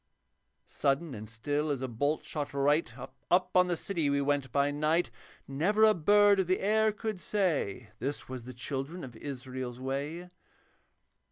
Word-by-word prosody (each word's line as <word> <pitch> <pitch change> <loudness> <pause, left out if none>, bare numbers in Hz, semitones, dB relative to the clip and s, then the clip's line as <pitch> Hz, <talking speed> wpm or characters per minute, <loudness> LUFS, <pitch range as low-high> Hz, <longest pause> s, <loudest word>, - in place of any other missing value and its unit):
Sudden 140 +2 0
and 110 -2 -8
still 145 +7 -2
as 135 -3 -1
a - - -1
bolt 145 +6 -1
shot 145 -2 -4
right 145 +4 +2
Up 180 0 -1
on 180 0 +6
the 175 -1 0
city 165 -7 -1
we 140 0 +2
went 140 -2 0
by 140 +2 +2
night. 155 +1 +1 0.4
Never 180 +11 +2
a 215 0 +7
bird 205 +3 +5
of 190 - +1
the 185 - +2
air 220 +2 +3
could 215 -2 -4
say, 140 - -1
'This 140 +4 -4
was 130 -2 -7
the 130 - -8
children 140 +7 -4
of 125 -3 -9
Israel's 130 -2 -6
way.' 140 +7 -3
145 Hz, 165 wpm, -30 LUFS, 135-180 Hz, 0.4 s, a